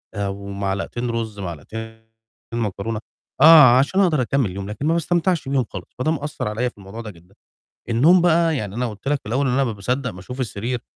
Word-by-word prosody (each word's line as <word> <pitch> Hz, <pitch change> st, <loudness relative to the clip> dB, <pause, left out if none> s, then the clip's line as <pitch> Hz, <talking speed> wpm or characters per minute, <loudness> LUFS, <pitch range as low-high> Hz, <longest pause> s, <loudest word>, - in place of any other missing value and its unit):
آآ 100 Hz, -1 st, -1 dB
ومعلقتين 100 Hz, +4 st, -3 dB
رُز، 110 Hz, -3 st, -3 dB
معلقتين 110 Hz, +6 st, -7 dB, 0.5 s
معكرونة، 110 Hz, -1 st, -2 dB, 0.4 s
آه، 150 Hz, -5 st, +9 dB
عشان 145 Hz, +8 st, +1 dB
أقدر 160 Hz, -8 st, +3 dB
أكمّل 130 Hz, -2 st, +1 dB
اليوم، 100 Hz, +2 st, -6 dB
لكن 105 Hz, +7 st, -5 dB
ما 160 Hz, -, +3 dB
باستمتعش 170 Hz, -2 st, 0 dB
بيهم 135 Hz, -3 st, +1 dB
خالص، 95 Hz, -3 st, -7 dB
فده 155 Hz, +5 st, +1 dB
مأثّر 150 Hz, -6 st, -3 dB
عليَّ 115 Hz, +4 st, -1 dB
في -, -, -25 dB
الموضوع 100 Hz, +3 st, -9 dB
ده 110 Hz, -2 st, -7 dB
جدًا. 90 Hz, +2 st, -21 dB, 0.5 s
النوم 155 Hz, +11 st, +5 dB
بقى 165 Hz, -1 st, +3 dB
يعني 105 Hz, -4 st, -5 dB
أنا 125 Hz, +1 st, -1 dB
قُلت 105 Hz, +4 st, -10 dB
لك 145 Hz, 0 st, +1 dB
في -, -, -65 dB
الأول 135 Hz, +5 st, 0 dB
إن 125 Hz, -, +1 dB
أنا 135 Hz, +2 st, +2 dB
ما 120 Hz, -, -1 dB
باصدّق 125 Hz, +6 st, -2 dB
باشوف 95 Hz, +7 st, -9 dB
السرير 120 Hz, 0 st, -3 dB
115 Hz, 195 wpm, -21 LUFS, 100-140 Hz, 0.5 s, آه